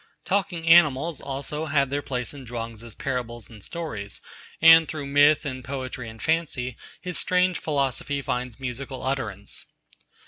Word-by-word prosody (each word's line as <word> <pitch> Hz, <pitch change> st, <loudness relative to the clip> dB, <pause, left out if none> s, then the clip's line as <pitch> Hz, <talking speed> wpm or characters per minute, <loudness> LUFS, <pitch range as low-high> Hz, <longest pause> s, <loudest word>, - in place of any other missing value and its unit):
Talking 185 Hz, -4 st, -1 dB
animals, 160 Hz, -2 st, +5 dB
also, 140 Hz, +3 st, -4 dB
have 140 Hz, -3 st, +2 dB
their 145 Hz, +1 st, 0 dB
place 125 Hz, -3 st, -3 dB
in 140 Hz, -2 st, -9 dB
Chuang 115 Hz, -1 st, -5 dB
Tzu's 115 Hz, 0 st, -11 dB
parables 120 Hz, -4 st, -4 dB
and 105 Hz, -3 st, -13 dB
stories, 110 Hz, -12 st, -5 dB, 0.4 s
and 165 Hz, 0 st, +8 dB
through 155 Hz, -3 st, -4 dB
myth 145 Hz, +2 st, +5 dB
and 130 Hz, -2 st, -4 dB
poetry 130 Hz, -2 st, -5 dB
and 110 Hz, 0 st, -12 dB
fancy 140 Hz, -6 st, 0 dB, 0.2 s
his 180 Hz, -1 st, -4 dB
strange 180 Hz, 0 st, +2 dB
philosophy 140 Hz, -1 st, -1 dB
finds 125 Hz, -2 st, -3 dB
musical 130 Hz, +1 st, -5 dB
utterance. 110 Hz, -7 st, -3 dB
135 Hz, 145 wpm, -25 LUFS, 125-155 Hz, 0.4 s, and